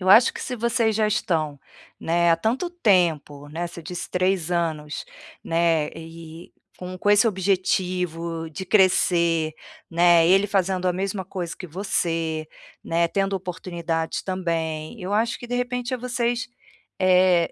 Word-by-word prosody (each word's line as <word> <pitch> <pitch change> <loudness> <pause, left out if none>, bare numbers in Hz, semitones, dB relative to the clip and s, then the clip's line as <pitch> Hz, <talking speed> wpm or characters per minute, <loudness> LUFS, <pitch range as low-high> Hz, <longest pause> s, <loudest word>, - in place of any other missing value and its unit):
eu 185 - -2
acho 225 +5 +7
que - - -7
se 250 - -4
vocês 230 -1 +1
já 215 -1 +2
estão, 160 -9 -1 0.4
né, 170 +1 +2
há 165 - +5
tanto 250 - -1
tempo, 170 - +1
né, 170 +3 -3
você 170 -1 -10
disse 175 +2 -6
3 185 -2 0
anos, 160 -4 -2 0.4
né, 165 -2 +2
e 165 0 -11 0.3
com 185 0 -7
com 205 - -1
esse 205 +3 +5
objetivo 180 -4 -1
de 190 +5 -6
crescer, 170 -4 +3 0.4
né, 170 0 +5
ele 195 +3 +5
fazendo 190 -2 0
a 180 - +2
mesma 190 +1 -3
coisa 175 -3 -5
que 185 - -8
você, 165 -3 -1 0.4
né, 170 +1 +1
tendo 195 +1 0
oportunidades 170 -3 -3
também, 165 -1 -3
eu 185 +2 -4
acho 230 +2 +1
que 240 - -9
de 245 - -3
repente 245 0 -2
é - - -1
vocês, 245 0 -1 0.5
eh, 180 -2 +4
180 Hz, 150 wpm, -24 LUFS, 165-200 Hz, 0.5 s, acho